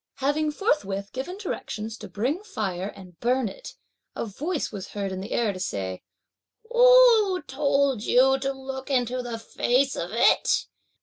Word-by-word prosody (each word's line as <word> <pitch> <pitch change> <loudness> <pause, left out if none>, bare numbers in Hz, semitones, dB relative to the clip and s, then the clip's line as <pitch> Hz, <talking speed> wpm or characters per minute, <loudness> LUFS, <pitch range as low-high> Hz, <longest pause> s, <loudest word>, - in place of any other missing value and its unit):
Having 295 +3 0
forthwith 200 - -1
given 275 +9 -5
directions 225 - -5
to - - -8
bring 245 - -1
fire 195 - -3
and 185 -4 -12
burn 250 0 +1
it, - - -9 0.4
a - - -3
voice 295 - -3
was 195 -3 -6
heard 200 -2 -3
in 190 0 -4
the 200 - -8
air 225 -4 +1
to 185 - -8
say, 95 - -3 0.7
"Who 480 -7 +6
told 275 -3 +1
you 265 +4 +4
to 275 0 -1
look 265 0 -7
into 250 -2 0
the 240 -2 -5
face 255 +4 0
of 170 - -4
it? 230 - +3
255 Hz, 160 wpm, -25 LUFS, 205-295 Hz, 0.7 s, Who